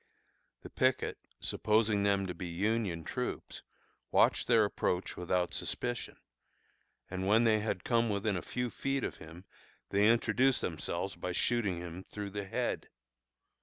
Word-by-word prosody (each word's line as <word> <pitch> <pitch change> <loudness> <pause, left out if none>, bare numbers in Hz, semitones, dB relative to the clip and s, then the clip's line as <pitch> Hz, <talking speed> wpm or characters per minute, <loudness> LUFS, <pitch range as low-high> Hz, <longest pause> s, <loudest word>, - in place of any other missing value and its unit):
The - - -9
picket, - - +1 0.2
supposing 105 -1 +2
them 100 -1 +2
to 90 - -3
be 90 +1 -6
Union 95 -1 -1
troops, - - -4 0.5
watched - - +3
their 115 -3 +5
approach 90 -2 -1
without 90 0 0
suspicion; 120 -1 -3 0.9
and 95 +1 -2
when 110 +3 +5
they 110 -2 +4
had 110 +1 -2
come 115 -1 +2
within 100 0 0
a 90 - -2
few 125 +5 -3
feet 135 -1 -1
of - - -3
him 85 +3 -12 0.5
they 105 +3 +5
introduced 130 +3 +3
themselves 80 -3 -2
by 90 - -4
shooting 105 -2 +1
him 90 +1 -7
through 105 0 -6
the 100 0 -4
head. 95 - -2
100 Hz, 145 wpm, -32 LUFS, 90-115 Hz, 0.9 s, their